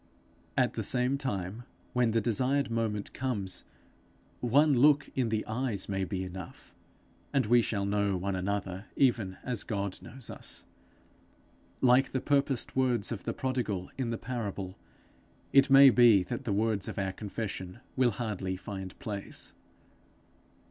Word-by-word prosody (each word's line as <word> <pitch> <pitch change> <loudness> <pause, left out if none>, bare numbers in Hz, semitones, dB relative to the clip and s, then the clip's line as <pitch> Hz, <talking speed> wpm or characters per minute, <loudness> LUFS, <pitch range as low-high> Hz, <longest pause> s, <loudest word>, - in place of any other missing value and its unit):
At - - +3
the - - -3
same 125 +2 +2
time, 100 -5 -3 0.3
when 125 -2 +3
the 115 +1 +2
desired 125 +4 +1
moment 110 -3 -2
comes, 110 -8 -3 0.7
one 145 +5 +4
look 145 +3 +5
in 125 -3 0
the 110 -1 -1
eyes 110 -3 -2
may 95 -1 -1
be 95 -1 -3
enough, 95 -1 -9 0.6
and 135 -4 +2
we 120 +2 +5
shall 100 -3 -1
know 100 -1 +1
one 95 +2 -2
another 95 +1 -3
even 115 -8 +2
as 125 -4 -1
God 100 -3 -3
knows 125 0 -7
us. - - -5 1.2
Like 130 +1 +4
the 130 - +1
purposed 140 -2 0
words 125 -5 +1
of 115 - -5
the - - -1
prodigal 120 -8 -2
in 130 -3 -2
the 115 - -2
parable, 100 -6 -4 0.8
it 135 0 +6
may 135 0 +9
be 115 -6 +6
that 120 +6 -5
the 110 - -1
words 105 -1 +1
of - - -6
our 95 -1 -1
confession 100 -2 -5 0.2
will 130 -2 +4
hardly 100 -4 -3
find 95 -1 -7
place. 100 -2 -6
110 Hz, 150 wpm, -30 LUFS, 100-125 Hz, 1.2 s, may